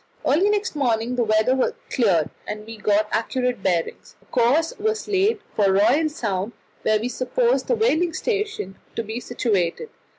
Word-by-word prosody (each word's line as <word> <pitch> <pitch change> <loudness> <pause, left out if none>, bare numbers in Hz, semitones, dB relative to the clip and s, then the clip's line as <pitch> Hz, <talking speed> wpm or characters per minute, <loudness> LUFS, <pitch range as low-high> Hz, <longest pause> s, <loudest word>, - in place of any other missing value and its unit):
Early 340 +9 +3
next 420 -2 0
morning 240 -3 0
the 245 - +2
weather 245 - +2 0.2
cleared, 180 - +2 0.2
and 210 0 -5
we 225 0 -9
got 210 0 +2
accurate 250 0 -1
bearings. 175 -4 -2
A - - -28
course 255 +9 +2
was 435 +1 -1
laid 410 +2 +2 0.2
for 200 -2 +3
Royal 280 +11 +3
Sound, 210 - -3 0.3
where 215 0 +2
we 230 - -2
supposed 470 - 0
the - - +2
whaling 355 -7 +2
station 420 - -3 0.2
to 230 - -2
be 220 +2 -5
situated. 225 - -1
245 Hz, 160 wpm, -23 LUFS, -, 0.3 s, Early